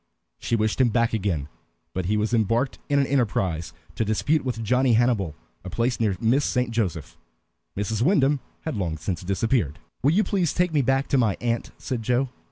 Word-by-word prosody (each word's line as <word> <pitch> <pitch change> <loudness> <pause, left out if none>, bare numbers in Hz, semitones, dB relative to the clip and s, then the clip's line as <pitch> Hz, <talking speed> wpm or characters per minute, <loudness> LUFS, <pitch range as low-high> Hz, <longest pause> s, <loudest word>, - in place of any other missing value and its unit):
She 115 - 0
wished 110 +3 +1
him 125 - +4
back 115 0 +1
again, 95 -10 -1 0.5
but 95 -1 -2
he 105 +4 +1
was 105 +3 0
embarked 115 +3 +1
in 140 - +3
an 140 - +3
enterprise 95 - 0 0.2
to - - -1
dispute 135 +8 +1
with 120 -3 -3
Johnny 125 +3 +3
Hannibal 110 -9 +2 0.3
a 95 - -6
place 115 +6 0
near 105 -5 +1
Miss 125 +6 +2
St. 125 -3 0
Joseph. 110 -8 -2 0.6
Mrs. 105 +2 -1
Wyndham 145 -2 +3 0.2
had 160 - -4
long 85 -6 -2
since 85 +1 -3
disappeared. 100 - 0 0.2
"Will 135 - +3
you 210 +4 +4
please 185 -7 0
take 180 -2 +1
me 145 - +3
back 135 +1 +1
to 135 - +3
my 110 -5 +2
aunt?" 120 -1 -1
said 125 -3 -4
Joe. 125 +4 +1
115 Hz, 190 wpm, -25 LUFS, 100-135 Hz, 0.6 s, him